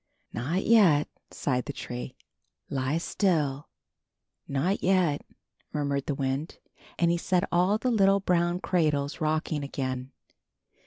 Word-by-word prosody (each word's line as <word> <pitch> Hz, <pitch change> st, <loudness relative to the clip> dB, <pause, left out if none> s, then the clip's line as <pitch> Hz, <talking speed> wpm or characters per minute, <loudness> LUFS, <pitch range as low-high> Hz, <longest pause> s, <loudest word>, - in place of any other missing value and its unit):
''Not 155 Hz, -, -1 dB
yet," 185 Hz, -11 st, +5 dB, 0.2 s
sighed 125 Hz, -3 st, -1 dB
the 145 Hz, -, -5 dB
tree. 125 Hz, 0 st, -6 dB, 0.6 s
"Lie 135 Hz, +3 st, 0 dB
still." 155 Hz, -6 st, 0 dB, 0.8 s
"Not 150 Hz, +9 st, 0 dB
yet," 180 Hz, -6 st, +2 dB, 0.5 s
murmured 140 Hz, -2 st, -1 dB
the 145 Hz, -, -1 dB
wind, 135 Hz, +3 st, -2 dB, 0.4 s
and 170 Hz, -1 st, +3 dB
he 170 Hz, -, +1 dB
set 180 Hz, +1 st, +1 dB
all 180 Hz, +4 st, +3 dB
the 250 Hz, +3 st, 0 dB
little 195 Hz, -3 st, +4 dB
brown 175 Hz, -1 st, +1 dB
cradles 150 Hz, -3 st, 0 dB
rocking 155 Hz, -1 st, 0 dB
again. 130 Hz, -2 st, -4 dB
155 Hz, 120 wpm, -28 LUFS, 140-180 Hz, 0.8 s, yet